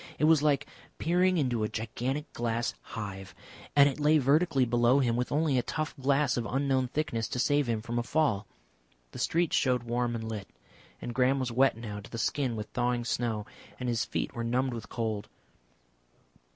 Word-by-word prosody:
It -, -, -2 dB
was 155 Hz, -1 st, +6 dB
like 145 Hz, -2 st, +2 dB, 0.3 s
peering 180 Hz, +3 st, +2 dB
into 125 Hz, -7 st, +1 dB
a 105 Hz, -, 0 dB
gigantic 125 Hz, +6 st, -3 dB
glass 120 Hz, 0 st, -1 dB
hive, 95 Hz, -3 st, -7 dB, 0.4 s
and 140 Hz, -1 st, +8 dB
it 140 Hz, +1 st, -2 dB
lay 150 Hz, +1 st, +4 dB
vertically 145 Hz, 0 st, +3 dB
below 120 Hz, +2 st, +3 dB
him 120 Hz, -4 st, +2 dB
with 125 Hz, +1 st, -1 dB
only 145 Hz, -3 st, +2 dB
a -, -, +2 dB
tough 155 Hz, +4 st, -3 dB
glass 140 Hz, -1 st, +1 dB
of 115 Hz, -2 st, -1 dB
unknown 130 Hz, +1 st, +1 dB
thickness 120 Hz, -5 st, -2 dB
to -, -, -4 dB
save 145 Hz, +1 st, +2 dB
him 110 Hz, -2 st, -1 dB
from 120 Hz, +1 st, -2 dB
a -, -, +1 dB
fall. 120 Hz, -7 st, 0 dB, 0.6 s
The -, -, -8 dB
street 170 Hz, 0 st, +1 dB
showed 125 Hz, -2 st, +2 dB
warm 120 Hz, 0 st, -1 dB
and 110 Hz, -1 st, -4 dB
lit, 105 Hz, -3 st, -5 dB, 0.6 s
and 120 Hz, -, -4 dB
Graham 130 Hz, +2 st, +3 dB
was 130 Hz, -2 st, -2 dB
wet 130 Hz, 0 st, +3 dB
now 105 Hz, -3 st, -6 dB
to 100 Hz, -, -11 dB
the 115 Hz, -, -6 dB
skin 130 Hz, 0 st, 0 dB
with 105 Hz, -1 st, -4 dB
thawing 120 Hz, -1 st, 0 dB
snow, 115 Hz, -3 st, -1 dB, 0.3 s
and 125 Hz, -, -3 dB
his 115 Hz, -2 st, +1 dB
feet -, -, -3 dB
were 120 Hz, -, -4 dB
numbed 125 Hz, +2 st, 0 dB
with 115 Hz, -2 st, -7 dB
cold. 110 Hz, -3 st, -3 dB
125 Hz, 190 wpm, -29 LUFS, 115-140 Hz, 0.6 s, and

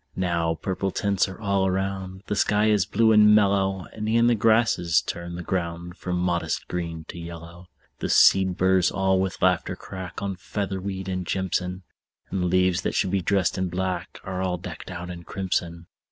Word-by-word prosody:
Now 85 Hz, -3 st, 0 dB
purple 95 Hz, +3 st, -2 dB
tints 100 Hz, 0 st, 0 dB
are 95 Hz, -, -9 dB
all 100 Hz, -2 st, +1 dB
around; 95 Hz, 0 st, -3 dB
The 105 Hz, -, -2 dB
sky 105 Hz, +1 st, +3 dB
is 100 Hz, -2 st, +2 dB
blue 110 Hz, +1 st, +3 dB
and 105 Hz, -1 st, +7 dB
mellow; 95 Hz, -2 st, +2 dB
And 110 Hz, 0 st, -4 dB
e'en 115 Hz, +1 st, +4 dB
the 120 Hz, -, +5 dB
grasses 110 Hz, -6 st, +3 dB
turn 85 Hz, 0 st, -6 dB
the 85 Hz, -, -6 dB
ground 85 Hz, -1 st, -3 dB
From 90 Hz, -1 st, -3 dB
modest 90 Hz, -1 st, -1 dB
green 85 Hz, -2 st, -4 dB
to 85 Hz, -, -7 dB
yellow. 85 Hz, +1 st, -9 dB, 0.3 s
The -, -, -3 dB
seed 95 Hz, -2 st, +5 dB
burrs 95 Hz, -1 st, +3 dB
all 95 Hz, -1 st, +1 dB
with 95 Hz, -1 st, -2 dB
laughter -, -, +2 dB
crack 95 Hz, -1 st, -8 dB
On 100 Hz, -1 st, -3 dB
featherweed 95 Hz, 0 st, -4 dB
and 90 Hz, -2 st, -3 dB
jimson; 95 Hz, 0 st, -2 dB, 0.5 s
And 90 Hz, -2 st, -1 dB
leaves 90 Hz, 0 st, +2 dB
that -, -, -2 dB
should 95 Hz, -, +1 dB
be 95 Hz, -1 st, +1 dB
dressed 95 Hz, 0 st, +1 dB
in 95 Hz, -1 st, -1 dB
black 95 Hz, +1 st, -3 dB
Are 95 Hz, -1 st, -4 dB
all 90 Hz, -1 st, -1 dB
decked 90 Hz, -, -8 dB
out 90 Hz, -1 st, -6 dB
in 85 Hz, -1 st, -8 dB
crimson. 85 Hz, -2 st, -3 dB
95 Hz, 180 wpm, -25 LUFS, 90-100 Hz, 0.5 s, and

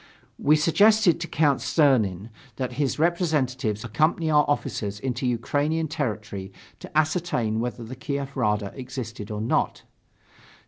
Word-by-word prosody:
We 150 Hz, -, +4 dB
suggested 200 Hz, +4 st, +4 dB
to 170 Hz, -, -4 dB
Count 145 Hz, -4 st, +2 dB
Czernin 115 Hz, -, +2 dB, 0.2 s
that 125 Hz, 0 st, -3 dB
his 140 Hz, -, 0 dB
representatives 145 Hz, -, 0 dB
accompany 155 Hz, +8 st, +1 dB
our 150 Hz, -1 st, +5 dB
officers 110 Hz, -8 st, -2 dB
into 130 Hz, 0 st, -2 dB
Ukrainian 145 Hz, +7 st, 0 dB
territory 105 Hz, -, -4 dB, 0.3 s
to -, -, -6 dB
ascertain 155 Hz, -9 st, +1 dB
whether 120 Hz, 0 st, -3 dB
the 120 Hz, +3 st, -8 dB
Kiev 140 Hz, +1 st, -4 dB
Rada 105 Hz, -5 st, 0 dB
existed 125 Hz, -5 st, -6 dB
or 105 Hz, -1 st, -4 dB
not. 110 Hz, -, 0 dB
130 Hz, 130 wpm, -25 LUFS, 110-155 Hz, 0.3 s, our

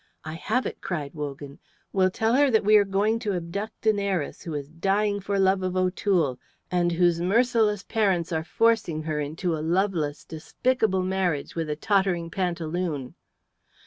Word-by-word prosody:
"I 155 Hz, -, -5 dB
have 220 Hz, +9 st, -1 dB
it," -, -, -5 dB
cried 150 Hz, -6 st, -4 dB
Wogan. 145 Hz, -2 st, -7 dB, 0.3 s
"We'll 185 Hz, -1 st, +3 dB
tell 225 Hz, +4 st, 0 dB
her 280 Hz, +2 st, +4 dB
that 220 Hz, -3 st, +3 dB
we 210 Hz, +1 st, +5 dB
are 205 Hz, -, +5 dB
going 205 Hz, +3 st, +1 dB
to 215 Hz, -4 st, -2 dB
abduct 195 Hz, +6 st, -5 dB
an 215 Hz, -2 st, +3 dB
heiress 190 Hz, -7 st, -2 dB
who 165 Hz, -3 st, -5 dB
is 140 Hz, -1 st, -4 dB
dying 200 Hz, +4 st, 0 dB
for 200 Hz, +1 st, -2 dB
love 190 Hz, 0 st, +3 dB
of 185 Hz, 0 st, -2 dB
O'Toole, 180 Hz, -7 st, +1 dB, 0.3 s
and 175 Hz, -1 st, +2 dB
whose 170 Hz, 0 st, +2 dB
merciless 215 Hz, +1 st, +2 dB
parents 190 Hz, -6 st, 0 dB
are 160 Hz, -1 st, -1 dB
forcing 215 Hz, -5 st, +1 dB
her 155 Hz, -1 st, -2 dB
into 160 Hz, +4 st, -2 dB
a 155 Hz, -, -4 dB
loveless, 165 Hz, -3 st, 0 dB
despicable 190 Hz, +4 st, 0 dB
marriage 185 Hz, -6 st, -1 dB
with 165 Hz, -2 st, -3 dB
a 150 Hz, -, -1 dB
tottering 185 Hz, -2 st, 0 dB
pantaloon." 170 Hz, -6 st, -2 dB
185 Hz, 170 wpm, -25 LUFS, 160-205 Hz, 0.3 s, we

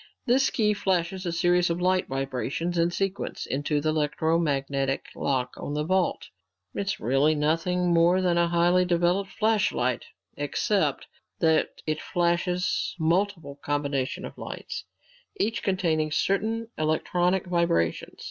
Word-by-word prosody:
This 265 Hz, +2 st, +3 dB
key 210 Hz, -3 st, +2 dB
flashes 185 Hz, -2 st, -1 dB
a -, -, 0 dB
series 175 Hz, +1 st, +2 dB
of 170 Hz, +1 st, -1 dB
light 185 Hz, +1 st, +2 dB
vibrations, 135 Hz, +5 st, -2 dB
in 170 Hz, 0 st, +2 dB
sequence, 195 Hz, +2 st, -3 dB
into 145 Hz, +2 st, -1 dB
the 155 Hz, +2 st, 0 dB
electromagnetic 145 Hz, -3 st, 0 dB
lock 130 Hz, -2 st, -1 dB
on 145 Hz, -, -5 dB
the 150 Hz, -, 0 dB
vault. 185 Hz, +3 st, 0 dB, 0.4 s
It's 200 Hz, 0 st, -2 dB
really 135 Hz, +7 st, +2 dB
nothing 170 Hz, +4 st, +1 dB
more 170 Hz, +2 st, +4 dB
than 180 Hz, -2 st, +2 dB
a 170 Hz, 0 st, +3 dB
highly 175 Hz, +2 st, +3 dB
developed 180 Hz, +2 st, +1 dB
flashlight 210 Hz, -, +1 dB, 0.3 s
except 145 Hz, +1 st, 0 dB, 0.3 s
that 160 Hz, -2 st, +1 dB
it 155 Hz, 0 st, -2 dB
flashes 175 Hz, 0 st, 0 dB
multiple 165 Hz, -3 st, 0 dB
combinations 140 Hz, -2 st, -1 dB
of -, -, -10 dB
lights, -, -, -6 dB, 0.5 s
each 225 Hz, +2 st, 0 dB
containing 160 Hz, -5 st, 0 dB
certain 220 Hz, +7 st, 0 dB
electronic 175 Hz, +4 st, +1 dB
vibrations. 170 Hz, -, 0 dB
170 Hz, 130 wpm, -26 LUFS, 150-185 Hz, 0.5 s, more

